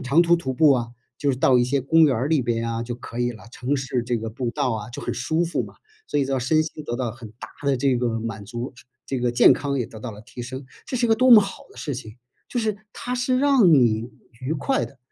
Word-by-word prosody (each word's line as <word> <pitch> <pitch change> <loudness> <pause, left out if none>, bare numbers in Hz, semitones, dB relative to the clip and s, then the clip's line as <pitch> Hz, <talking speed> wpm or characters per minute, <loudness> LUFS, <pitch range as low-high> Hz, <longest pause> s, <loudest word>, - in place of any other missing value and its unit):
长 135 +6 +3
途 170 0 +4
徒 150 -6 -2
步 145 +3 +5
啊， 120 -3 0 0.3
就 145 - +1
是 130 - -1
到 130 0 +4
一 120 - +4
些 135 +3 +1
公 160 +5 +4
园 140 -4 +3
儿 125 +5 -1
里 150 -3 +2
边 115 -1 -1
啊 115 0 -2
就 120 +1 -5
可 120 -1 -9
以 120 0 +1
了， 110 - -14
城 130 +3 -1
市 130 -2 -2
这 120 0 -1
个 115 0 -4
步 120 +2 -3
道 125 +1 -1
啊 110 0 -4
就 120 - -7
很 - - -2
舒 160 +7 0
服 170 - -1
嘛。 - - -10 0.3
所 - - 0
以 140 - +2
说 135 -1 -1
身 155 +6 +2
心 155 -1 -7
得 120 - -3
到 125 -2 -2
很 120 -3 -11
大 - - -8 0.2
的 140 -1 +2
这 130 0 +2
个 120 -2 -1
满 110 -2 -5
足， 120 +4 -6 0.3
这 135 - -2
个 120 0 +1
健 120 - +6
康 140 -1 -2
也 125 - 0
得 110 -2 -12
到 125 - -5
了 105 -1 -11
提 125 +2 -11
升， 130 +3 -7 0.2
这 255 - -3
是 240 -1 +2
一 - - -4
个 225 - +5
多 255 +3 +3
么 230 -3 +11
好 195 - -5
的 - - -19
事 145 - -4
情。 110 -3 -9 0.3
就 245 - -3
是 220 -3 0 0.2
它 250 - -4
是 250 +1 +1
让 265 -10 +5
你 120 -4 +3 0.3
愉 130 +4 -2
快 210 - 0
的， 135 - -13
130 Hz, 300 characters per minute, -23 LUFS, 120-155 Hz, 0.3 s, 么